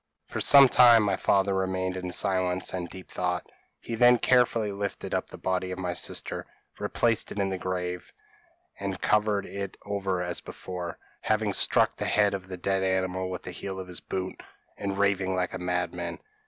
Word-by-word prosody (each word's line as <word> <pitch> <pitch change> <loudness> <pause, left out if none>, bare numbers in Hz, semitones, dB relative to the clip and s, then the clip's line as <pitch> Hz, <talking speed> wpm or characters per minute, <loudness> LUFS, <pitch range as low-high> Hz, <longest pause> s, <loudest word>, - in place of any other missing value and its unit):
p> - - -19
"For - - -1
some 140 -1 +8
time 120 -3 +7
my 100 - +1
father 100 0 +2
remained 95 -1 -1
in 90 -1 -4
silence 95 0 0
and 90 -2 -3
deep 95 -1 -10
thought. 90 -1 -2 0.3
He 115 - -7
then 120 +2 +6
carefully 115 -3 +3
lifted 100 0 -4
up - - -1
the - - -9
body 95 0 -1
of 95 - -5
my 90 -2 -2
sister, - - -3 0.3
replaced 115 -2 0
it - - -7
in 100 -1 +1
the 95 -1 -3
grave, 90 -1 -4 0.7
an 95 -1 -3
covered 105 0 +1
it 100 -1 -6
over 95 -3 -1
as 90 -1 -2
before, 90 -2 -7 0.2
having 110 -2 0
struck - - +3
the - - -2
head 105 -1 +3
of 95 -1 -5
the 95 -1 -6
dead 95 +2 0
animal 95 -1 0
with 90 -1 -5
the 90 - -6
heel 95 +2 -6
of 95 - -7
his 90 - -5
boot, 95 0 -5 0.3
and 100 -1 -3
raving 100 -2 +1
like 90 -1 -1
a 95 - -4
madman. 90 -1 -2
95 Hz, 190 wpm, -27 LUFS, 90-100 Hz, 0.7 s, some